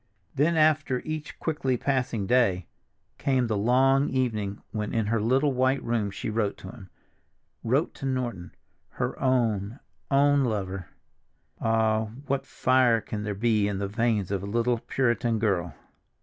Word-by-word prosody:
Then, 160 +4 +2
after 155 -4 +2
each 155 -1 -5
quickly 135 -5 -1
passing 125 -6 -1
day, 95 -6 +2 0.5
came 130 -3 +1
the 110 -2 -1
long 130 +6 +3
evening 110 -6 -1
when 105 0 -3
in 110 -2 +1
her 110 +1 0
little 135 +5 +2
white 130 +2 +1
room 115 -3 0
she 100 - -6
wrote 105 -2 -1
to 95 - -9
him—wrote 120 - -5
to 135 - -5
Norton, 120 -9 -3 0.4
her - - -3
own, 115 -3 0 0.3
own 145 0 +4
lover. 95 -6 -3 0.7
Ah, 110 -1 +2 0.2
what 135 -1 -2
fire 130 -2 +3
there 105 - -4
can 105 0 -3
be 110 -2 +2
in 100 -1 -2
the 100 0 -2
veins 110 -2 0
of 100 -2 -1
a 100 - -6
little 115 +3 +1
Puritan 120 -2 0
girl! 90 -8 -1
115 Hz, 150 wpm, -26 LUFS, 105-130 Hz, 0.7 s, own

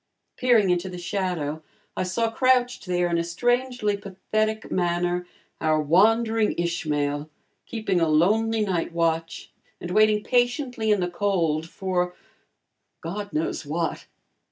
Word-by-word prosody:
Peering 230 -7 +3
into 180 +1 0
the 180 - -7
shadow, 175 -4 -2 0.3
I - - -2
saw 225 +5 0
crouched 250 -3 +2
there 180 -1 +1
in 170 -1 0
a - - 0
strangely 245 +4 0
pathetic 215 +2 -2
manner, 175 0 0 0.3
our 155 -1 +2
wandering 220 +8 +3
Ishmael, 150 -3 -1 0.4
keeping 200 -6 -1
a 165 - +3
lonely 215 +8 +3
night 180 -5 -1
watch 165 -1 -1 0.3
and 175 - -6
waiting 215 +1 +4
patiently 245 -1 0
in 205 -3 +3
the 180 - +1
cold 170 -4 0
for 180 -1 -2 0.9
God 200 +5 -5
knows 155 +2 -2
what. 160 +3 -3
185 Hz, 130 wpm, -25 LUFS, 170-220 Hz, 0.9 s, waiting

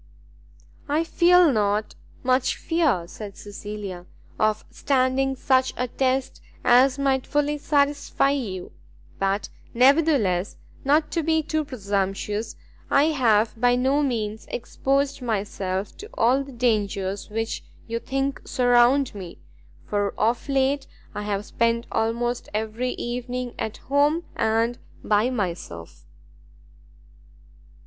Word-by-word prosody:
"I 305 +3 +2
feel 345 -1 +5
not 210 -2 0 0.3
much 255 0 +2
fear," 310 - +1
said 200 +1 -9
Cecilia, 205 -3 -7 0.3
"of 215 0 +1
standing 270 0 +1
such 260 0 +2
a 250 - -1
test 260 +1 -1 0.2
as 255 +2 +5
might 270 -2 +1
fully 295 0 0
satisfy 285 -1 +1
you; 210 -10 -4 0.5
but 195 +1 0 0.3
nevertheless, 255 - +3 0.3
not 300 +3 +2
to 335 - 0
be 320 0 +1
too 310 0 -1
presumptuous, 205 -3 -2 0.3
I 290 +3 +4
have 225 -6 +3
by 245 0 +4
no 265 +4 +2
means 220 -6 -2
exposed 275 +3 -1
myself 200 -4 -2
to 425 - -9
all 255 +4 +3
the 275 - -11
dangers 205 -5 -1
which 225 +1 -3 0.2
you 230 0 -3
think 270 +2 -2
surround 245 +2 +3
me, 185 -4 -8 0.5
for 205 -1 -1
of 235 +5 0
late 275 0 +1 0.3
I 210 - -4
have 205 0 -2
spent 230 0 0
almost 235 +2 -1
every 220 +4 -2
evening 245 0 -4
at 220 - -3
home 290 +5 +1
and 225 +2 +1 0.2
by 215 +3 +2
myself." 170 - -5
245 Hz, 115 wpm, -24 LUFS, 210-275 Hz, 0.5 s, feel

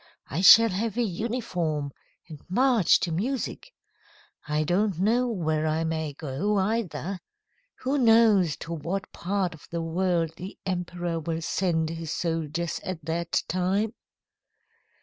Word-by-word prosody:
I 160 +7 -1
shall 225 +4 +9
have 215 +3 -2
a 240 - +2
uniform, 180 - -2 0.4
and 155 -4 -10
march 240 -1 +4
to 170 - -1
music. 245 - -3 0.8
I 150 0 +1
don't 185 +3 +1
know 235 +6 +2
where 160 -8 -1
I 155 +1 0
may 160 -2 -2
go, 155 +9 -2
either. 195 -2 -1 0.6
Who 275 +3 0
knows 225 - +5
to 170 - -5
what 175 +5 -4
part 185 -1 -1
of 160 - -15
the 170 -1 -3
world 170 -1 0
the 185 +3 -8
emperor 175 -2 -2
will 165 +1 -3
send 160 -3 0
his 165 -1 -5
soldiers 165 0 -2
at 170 -5 -5
that 170 +1 -1
time?" 195 +5 0
180 Hz, 135 wpm, -26 LUFS, 160-205 Hz, 0.8 s, shall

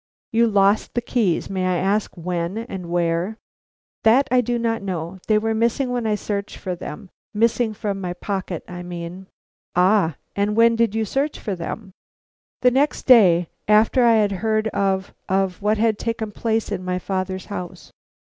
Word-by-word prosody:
"You 230 +1 +4
lost 200 0 +2
the - - +3
keys; 225 -8 0
may 185 -1 -1
I 180 -1 +1
ask 195 +2 0
when 175 +2 -3
and 195 -7 -6
where?" 175 +4 0 0.6
"That 240 +5 +4
I 255 0 +5
do 240 0 -1
not 230 -1 -1
know; 180 -1 -4
they 215 - +4
were 225 +1 0
missing 235 +4 +1
when 245 -2 -1
I 210 - +2
searched 200 -1 -4
for 185 -2 -4
them; 175 +2 -8 0.2
missing 230 +1 +2
from 200 -2 -3
my 180 -1 -3
pocket, 185 -2 -4
I 180 0 -7
mean." 175 +1 -7 0.5
"Ah! 180 -3 +3 0.2
and 205 +1 0
when 230 +1 +5
did 225 -2 +1
you 220 0 0
search 275 +8 -1
for 205 - -4
them?" 190 +3 -6 0.7
"The 250 - +6
next 280 +4 +1
day 180 -9 +6 0.2
after 215 +4 +4
I 230 -1 +6
had 210 -2 +3
heard 220 0 +1
of 190 -2 -1 0.2
of 190 -1 0
what 210 +2 +2
had 220 -1 +1
taken 230 -2 -3
place 225 0 -1
in 185 -3 -3
my 180 0 -1
father's 185 0 -3
house." 180 -4 -7
205 Hz, 175 wpm, -22 LUFS, 185-225 Hz, 0.7 s, The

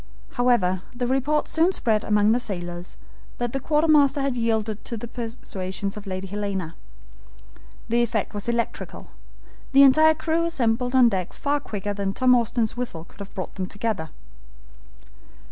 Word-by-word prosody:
However 235 -8 +2
the 245 0 -2
report 270 +4 +1
soon 330 +3 +3
spread 220 - +1
among 210 0 +3
the 240 - +3
sailors 175 -6 -5 0.4
that 240 -1 -2
the 270 - -1
quartermaster 300 -1 +3
had 275 -2 0
yielded 220 -2 -1
to 235 - -4
the 235 - -6
persuasions 200 -5 -5
of 210 -1 -9
Lady 185 0 -4
Helena. 195 -4 -3 1.1
The 235 +1 +2
effect 230 -2 -1
was 205 +2 -3
electrical. 235 -1 -3 0.6
The 275 +1 +8
entire 310 +4 +6
crew 325 +2 0
assembled 250 -5 0
on 250 -2 +7
deck 185 -4 -3
far 290 0 0
quicker 205 -6 -4
than 195 -1 -3
Tom 255 -1 +4
Austin's 235 -2 +1
whistle 240 -10 -4
could - - -21
have 200 -1 -9
brought 185 - -5
them 185 -2 -4
together. 200 -5 -3
230 Hz, 155 wpm, -24 LUFS, 200-260 Hz, 1.1 s, The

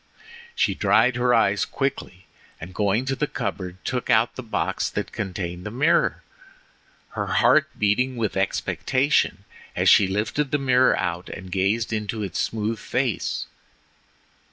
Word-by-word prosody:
She - - +2
dried 125 - +3
her 125 0 +2
eyes 105 -4 +3
quickly, 135 -9 -4 0.3
and 85 +3 -9
going 105 +5 0
to 135 0 -1
the 150 +2 -1
cupboard 90 -8 -4
took 125 -2 -3
out 115 +2 +3
the - - -5
box 115 -3 -2
that - - -4
contained 90 -3 -5
the 105 - -5
mirror, 150 +9 +1 0.9
her - - -4
heart 155 0 +4
beating 125 +5 +1
with 115 -3 -2
expectation 130 - 0 0.3
as - - +3
she 100 - +6
lifted 105 +9 -1
the 145 - +1
mirror 130 -2 +3
out 90 -1 -3
and 95 -1 -9
gazed 100 +5 0
into 105 0 -3
its 95 - -4
smooth 110 0 -2
face. 125 0 -2
110 Hz, 145 wpm, -24 LUFS, 95-130 Hz, 0.9 s, she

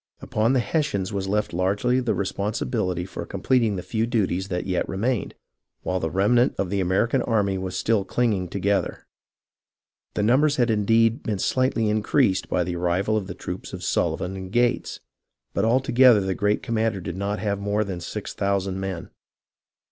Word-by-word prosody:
Upon 110 +4 0
the 130 - +3
Hessians 110 - -1
was 95 -1 -2
left 105 0 -1
largely 100 +8 +1
the 125 -2 0
responsibility 100 -2 -2
for - - -6
completing 115 -5 +1
the 90 - -4
few 115 0 -1
duties 95 -5 0
that 90 -2 -3
yet 90 -2 -1
remained, 115 +4 -1 0.5
while 95 - -1
the 80 - -2
remnant 120 +8 +3
of 95 -2 -2
the 100 - 0
American 95 +8 +1
army 100 -5 +1
was 95 -1 -4
still 110 -1 +1
clinging 105 -5 0
together. 100 +2 -1 1.1
The 105 - 0
numbers 140 +7 +3
had 120 -4 +2
indeed 115 +2 +3
been 105 -2 -2
slightly 130 +1 +1
increased 105 -1 +1
by 90 - +1
the 85 0 -3
arrival 90 +5 0
of 105 -3 -1
the - - -6
troops - - -7
of - - -6
Sullivan 95 +2 -1
and 95 -1 -7
Gates, 120 +2 0 0.5
but - - +1
all 120 +3 +4
together 125 -4 +5
the 95 0 -1
great 105 +3 0
commander 115 -4 0
did 85 -1 -5
not 100 +2 -2
have 100 -2 -2
more 105 +1 0
than 95 -4 -5
six - - -5
thou 100 0 +1
sand 95 0 -3
men. 95 -3 -5
100 Hz, 180 wpm, -24 LUFS, 95-115 Hz, 1.1 s, together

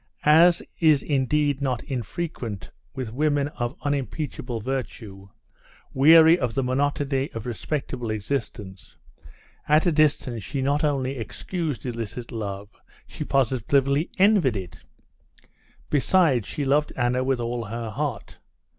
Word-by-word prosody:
As 165 +3 +6 0.2
is 155 -4 +4
indeed 145 0 +1
not 130 -4 -1
unfrequent 120 - -5 0.2
with 125 -5 -5
women 145 +1 +1
of 120 -2 -4
unimpeachable 140 -3 -3
virtue, 110 -5 -5 0.6
weary 160 +5 +7
of 120 -4 -2
the 135 - +1
monotony 135 +1 0
of 115 -1 -6
respectable 125 -1 -4
existence, 105 -4 -5 0.7
at 155 +3 +4
a 175 - +3
distance 145 -6 +1
she 140 +8 -4
not 140 +3 +1
only 135 -2 0
excused 150 - -4
illicit 115 0 -5
love, 100 -3 -5 0.4
she - - -7
positively 135 - +1
envied 190 - +4
it. 90 -2 -8 1.1
Besides, 145 - +3
she 145 - -3
loved 145 +2 +2
Anna 125 0 +1
with 130 -1 0
all 120 0 -3
her 115 +1 -5
heart. 135 -2 -4
135 Hz, 120 wpm, -24 LUFS, 115-150 Hz, 1.1 s, weary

